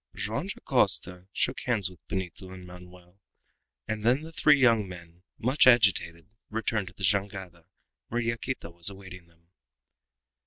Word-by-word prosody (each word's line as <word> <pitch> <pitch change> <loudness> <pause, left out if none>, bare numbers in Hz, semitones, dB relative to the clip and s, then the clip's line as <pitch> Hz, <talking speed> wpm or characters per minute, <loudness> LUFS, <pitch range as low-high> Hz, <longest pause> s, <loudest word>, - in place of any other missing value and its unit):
Joam - - -3
Dacosta 90 +1 0
shook - - -1
hands 115 -6 +1
with 90 -2 -12
Benito 95 0 -5
and 95 -1 -10
Manoel, 90 +1 -14 0.7
and 110 -1 -3
then 125 +5 +3
the 160 - -9
three 150 -3 +4
young 115 -6 +4
men, 85 -1 -12 0.2
much 130 +4 +3
agitated, 100 -6 +3 0.2
retired 110 -2 -1
to - - -10
the 95 - -11
jangada, 95 -3 -1 0.4
where 120 - -2
Yaquita 115 -5 -3
was 85 +2 -1
awaiting 95 -3 -11
them. 85 +1 -30
95 Hz, 145 wpm, -28 LUFS, 90-115 Hz, 0.7 s, three